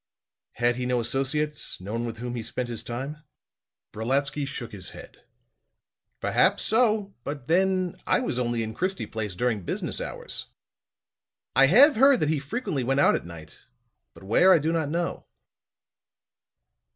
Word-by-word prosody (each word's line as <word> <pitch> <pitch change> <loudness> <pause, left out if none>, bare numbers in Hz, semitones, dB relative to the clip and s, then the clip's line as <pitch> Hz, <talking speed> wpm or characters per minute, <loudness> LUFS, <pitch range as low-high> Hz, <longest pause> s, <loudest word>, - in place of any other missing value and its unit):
"Had 120 0 +1
he 125 0 -2
no 125 -1 +1
associates 135 +5 -1
no 95 +3 -7
one 115 +1 -2
with 115 -1 -6
whom 120 +1 -5
he 120 - -3
spent 120 +2 -4
his 115 -2 -4
time?" 135 +5 -5 0.8
Brolatsky 135 +5 -1
shook 120 -3 -5
his 100 -4 -6
head. - - -13 1.0
"Perhaps - - +2
so; 215 -3 +2
but 140 -3 -6
then 185 +1 +1
I - - +3
was 140 - -2
only 120 -2 0
in 110 0 -5
Christie 185 - -2
Place 105 -4 -5
during 115 0 0
business 85 - -3
hours. - - -5 1.1
I 135 0 +7
have 255 - +7
heard 270 0 +6
that 150 - +2
he 155 -2 +1
frequently 140 - -3
went 135 +3 +1
out - - +5
at - - -3
night; 85 -3 -12 0.5
but - - -14
where 115 - +5
I - - +7
do 160 +1 0
not 160 -3 -1
know." 170 +2 -3
135 Hz, 160 wpm, -26 LUFS, 120-170 Hz, 1.1 s, I